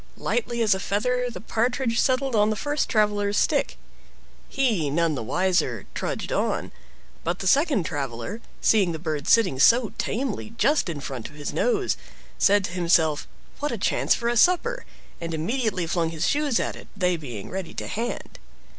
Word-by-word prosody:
Lightly 240 - -1
as 215 - +4
a 190 - -2
feather 250 +6 0
the 240 - -7
Partridge 235 +1 0
settled 260 -1 +1
on 210 0 +4
the 215 - 0
first 290 +5 -1
traveler's 205 -2 +1
stick. - - +1 0.7
He, 225 - +1
none 165 +2 +1
the 140 - -3
wiser, 130 - 0
trudged - - -3
on, - - -1 0.5
but 170 +2 -1
the 195 - -6
second 275 - +3
traveler, 140 - -4 0.2
seeing 195 -6 +3
the - - -3
bird 155 -3 -3
sitting 190 - +4
so 230 - +5
tamely 230 -2 -3
just 285 - +2
in 150 -4 -4
front 130 -5 -6
of 150 - -17
his 145 -1 -5
nose, 425 -5 +1 0.4
said 200 0 +4
to - - -5
himself, 170 -4 +2 0.3
"What 295 0 -1
a 235 - -2
chance 195 - +2
for 235 - -3
a 240 - +1
supper!" 365 - +3 0.4
and 165 -1 -3
immediately 205 +1 -1
flung 165 0 0
his 160 -1 -1
shoes 290 -4 +1
at - - -2
it, - - -12
they 180 -2 +2
being 125 -11 -7
ready 190 -3 -5
to - - -4
hand. 235 +3 -4
205 Hz, 175 wpm, -25 LUFS, 165-245 Hz, 0.7 s, so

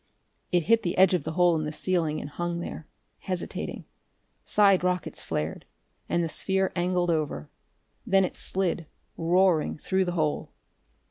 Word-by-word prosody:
It 175 -2 +3
hit 225 +5 +4
the 175 - -2
edge 190 0 +6
of 175 -6 0
the 160 - -3
hole 175 0 +4
in 155 - -1
the 150 - -3
ceiling, 160 -1 0
and - - -6
hung 175 +2 -3
there, 165 -2 -7 0.3
hesitating. 185 -2 -4 0.6
Side 195 -3 +4
rockets 180 -2 -1
flared, 75 +1 -3 0.5
and 170 - +1
the - - 0
sphere 190 +4 0
angled 175 0 +1
over. 150 - -2 0.5
Then 195 -1 +3
it - - -6
slid, 180 -4 -1 0.3
roaring, 175 -1 +2
through 190 +4 0
the 175 - -2
hole. 155 -3 -1
175 Hz, 155 wpm, -27 LUFS, 160-185 Hz, 0.6 s, edge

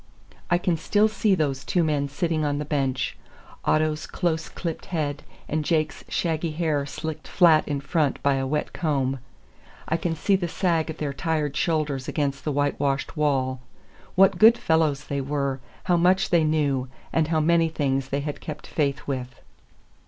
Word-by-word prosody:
I 175 - +4
can 175 -1 0
still 210 +6 +3
see 210 -1 +2
those 140 -5 -1
two 175 +5 +1
men 145 -3 0
sitting 155 +2 -1
on 145 -1 0
the 150 - -3
bench; 135 -3 -1 0.5
Otto's 155 0 +1
close 165 -3 -1
clipped 165 -3 -5
head 150 -4 -2 0.3
and 155 +1 -1
Jake's 155 0 0
shaggy 165 -1 -1
hair 150 -3 0
slicked 160 +2 -6
flat 165 -4 +5
in 145 -1 -1
front 150 -1 0
by 140 -1 +3
a 135 0 -1
wet 150 +2 -2
comb. 135 -5 0 0.7
I 160 - +1
can 165 0 -2
see 195 +5 +2
the 180 -2 -1
sag 170 -2 0
of 160 - -5
their 145 -2 -3
tired 150 -2 -1
shoulders 150 -5 0
against 140 -2 -1
the 150 - 0
whitewashed 145 0 0
wall. 130 -4 0 0.5
What 190 -1 +5
good 225 +2 +8
fellows 160 -6 +1
they 140 -1 -3
were, 140 -1 -2 0.2
how 175 - +2
much 185 +3 +3
they 170 -2 +4
knew, 145 -4 +1 0.3
and 160 -2 +2
how 160 -1 +1
many 165 +1 +3
things 135 -4 -1
they 140 +1 -1
had 145 0 -5
kept 155 - -7
faith 140 -3 -1
with! 130 -2 -4
155 Hz, 175 wpm, -25 LUFS, 140-165 Hz, 0.7 s, good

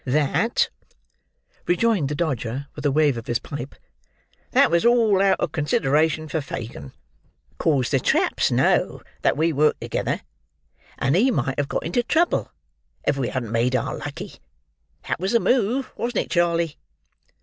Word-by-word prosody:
"That," 150 - +1 1.0
rejoined 180 -5 +2
the 150 - -2
Dodger, 135 -4 -2
with 145 - -8
a - - +2
wave 145 -3 +3
of 115 - -7
his 120 - +1
pipe, 145 0 -7 0.7
"That - - +4
was 170 0 +3
all 230 -5 +4
out 195 0 +3
of 155 - -1
consideration 155 +1 +1
for 160 0 -2
Fagin, 110 - -7 0.7
'cause 140 -6 +1
the 135 - +3
traps - - +1
know - - +1 0.2
that - - +2
we 160 +1 +2
work 150 +2 +2
together, - - -2 0.8
and 135 +5 +1
he 230 +9 +4
might 135 - -1
have 145 - 0
got - - -2
into 175 +9 +1
trouble 325 +8 +1 0.5
if - - +2
we 135 -3 -1
hadn't 120 -4 -4
made 120 +3 +1
our 125 - -1
lucky; - - -7 0.7
that - - -1
was 190 +5 -1
the 235 - +5
move, 250 +2 +1
wasn't 240 +1 -1
it, - - -19
Charley?" 170 -2 +1
155 Hz, 160 wpm, -23 LUFS, 135-190 Hz, 1.0 s, the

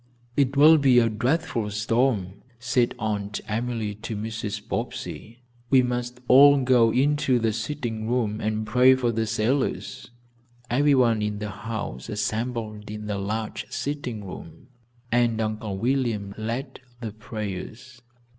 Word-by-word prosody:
"It 140 -1 +1
will 155 +2 +8
be 135 -3 +5
a 115 -1 +5
dreadful 120 0 -1
storm," 105 -2 0 0.2
said 125 -1 +1
Aunt 105 -2 -2
Emily 115 -1 -2
to 105 +1 -6
Mrs. 105 -1 -4
Bobbsey. 115 +3 -5 0.3
"We 130 -2 +5
must 125 0 -3
all 140 +3 +8
go 125 -3 +5
into 140 +1 +2
the 115 -2 0
sitting 115 -2 -4
room 115 -3 0
and 110 0 -1
pray 125 +4 +5
for 125 -2 0
the 115 -1 -1
sailors." 120 +6 -1 0.6
Everyone 125 -4 +3
in 105 0 -2
the 105 0 -4
house 100 - -6
assembled 110 0 -3
in 105 0 -6
the 105 -2 -3
large 110 +2 -3
sitting 130 -7 -4
room, 85 - -10 0.4
and 120 -2 +2
Uncle 110 -2 -3
William 115 -4 -1
led 120 +5 -4 0.2
the 115 -3 -5
prayers. 110 +3 -7
115 Hz, 135 wpm, -25 LUFS, 105-125 Hz, 0.6 s, will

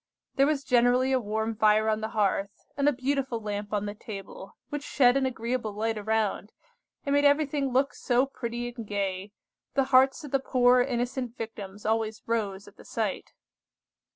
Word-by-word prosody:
There 275 +1 +3
was 295 -2 0
generally 250 +1 +3
a 260 - +3
warm 220 0 -2
fire 215 0 +4
on 215 0 +1
the 220 - -2
hearth, 200 -3 0 0.3
and 280 +1 +3
a - - +2
beautiful 265 -2 -1
lamp 205 -1 -4
on 210 -1 -1
the 205 - -4
table, 195 -2 -9
which 295 -1 -4
shed 255 -3 +3
an 270 -1 +2
agreeable 235 -2 -3
light 220 +2 -1
around, 215 0 -1 0.5
and 280 - 0
made 285 0 +3
everything 285 -1 +2
look 265 +3 +2
so 245 +1 +1
pretty 240 -2 -5
and 230 -4 -7
gay, 195 -1 -3 0.4
the 270 - +4
hearts 265 +4 +5
of 290 - -8
the 275 - +2
poor 250 -1 +4
innocent 245 -1 -2
Victims 205 -3 -7
always 220 0 -1
rose 205 -4 -2
at - - -16
the - - -14
sight. - - -3
235 Hz, 180 wpm, -27 LUFS, 215-265 Hz, 0.5 s, hearts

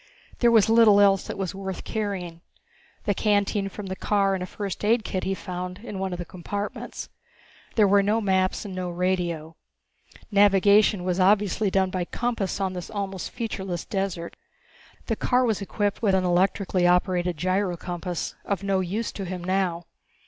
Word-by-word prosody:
There 240 - +5
was 225 -3 +5
little 225 -2 +6
else 195 -2 +4
that - - -5
was 190 -3 -3
worth 190 -1 -5
carrying 190 -6 -4 0.6
the 205 - +1
canteen 205 -1 +1
from 205 +1 -8
the 190 0 -4
car 195 0 +1
and 190 - -2
a 180 - -3
first 200 +1 -5
aid 225 +2 +3
kit 185 -4 -3
he 195 - 0
found 180 -1 -6
in 210 -5 -6
one 190 -1 -2
of 180 - -3
the 175 - -5
compartments. 200 +4 -5 0.7
There 215 -3 +5
were 200 +1 +5
no 210 +3 +1
maps 190 -1 +1
and 195 - -6
no 185 -1 -3
radio. 175 -3 -2 0.8
Navigation 200 -1 +5
was 180 0 -1
obviously 200 +2 +3
done 190 -1 +1
by 185 -2 -2
compass 230 -3 -2
on 190 -1 -1
this 180 -1 -6
almost 195 -4 -4
featureless 190 -7 -4
desert. 190 -4 -3 0.7
The - - -1
car 250 0 +2
was 220 -4 0
equipped 205 +1 -2
with 200 -4 +3
an 190 - +2
electrically 180 0 +2
operated 180 -1 +2
gyrocompass, 180 -1 -2
of 200 -2 -2
no 195 -1 +1
use 195 +5 -2
to 195 - -6
him 180 -1 -5
now. 180 -2 0
195 Hz, 170 wpm, -25 LUFS, 180-205 Hz, 0.8 s, little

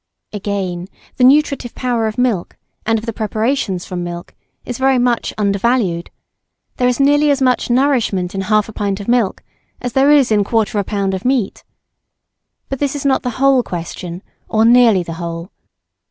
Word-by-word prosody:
Again, 190 -3 -3 0.3
the 250 - +2
nutritive 275 -2 +3
power 240 -3 -1
of 215 - -5
milk 240 -8 -1 0.3
and 225 0 +3
of 220 - -6
the 230 - -3
preparations 215 -3 -1
from 180 -1 -4
milk, 175 0 -7 0.3
is 245 0 -5
very 265 0 +3
much 245 -1 +1
undervalued; 200 -3 0 0.7
there 250 - +2
is 250 +1 0
nearly 290 +2 +4
as 280 -1 +2
much 255 -2 +1
nourishment 240 -8 +1
in 195 - -2
half 210 +1 +1
a 220 - -10
pint 200 -1 -2
of 200 - -8
milk 235 -5 +1 0.4
as 245 -1 -5
there 270 +2 +4
is 285 -5 +4
in 215 - +4
a - - +3
quarter 215 0 0
of 200 - -3
a - - -9
lb. 200 -2 0
of 190 - -4
meat. 250 -5 -1 1.0
But 270 - -4
this 285 -1 -1
is 285 - -5
not 270 -1 +2
the 250 - -2
whole 270 -1 +4
question 175 -2 -6 0.3
or 220 0 +2
nearly 230 -5 +5
the 165 - -6
whole. 170 +2 -6
225 Hz, 185 wpm, -17 LUFS, 195-255 Hz, 1.0 s, nearly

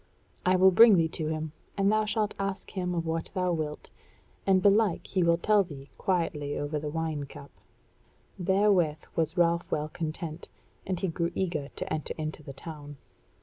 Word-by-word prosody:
I 185 - +5
will 190 +1 +6
bring 220 +2 +8
thee 165 -1 +3
to 160 -1 -3
him, 155 0 -3 0.3
and 195 +1 +3
thou 215 0 +2
shalt 215 -1 0
ask 195 0 -3
him 180 -2 -2
of 165 -1 -1
what 160 0 -2
thou 180 -1 +1
wilt, 155 -2 -4 0.6
and 190 -1 +5
belike 200 0 +3
he 190 - 0
will 170 -1 +4
tell 205 +3 +3
thee 140 -6 -11
quietly 160 -6 -1
over 145 +1 -2
the 150 0 -4
wine 155 -2 -2
cup." 140 0 -12 0.9
Therewith 185 -4 +2
was 160 +1 0
Ralph 170 0 +2
well 150 0 -1
content, 160 0 -5 0.4
and 185 -2 -1
he 190 - 0
grew 170 0 -1
eager 170 -7 -1
to - - -3
enter 155 -1 -2
into 155 0 -4
the 140 - -9
town. 145 0 -8
170 Hz, 180 wpm, -28 LUFS, 155-190 Hz, 0.9 s, bring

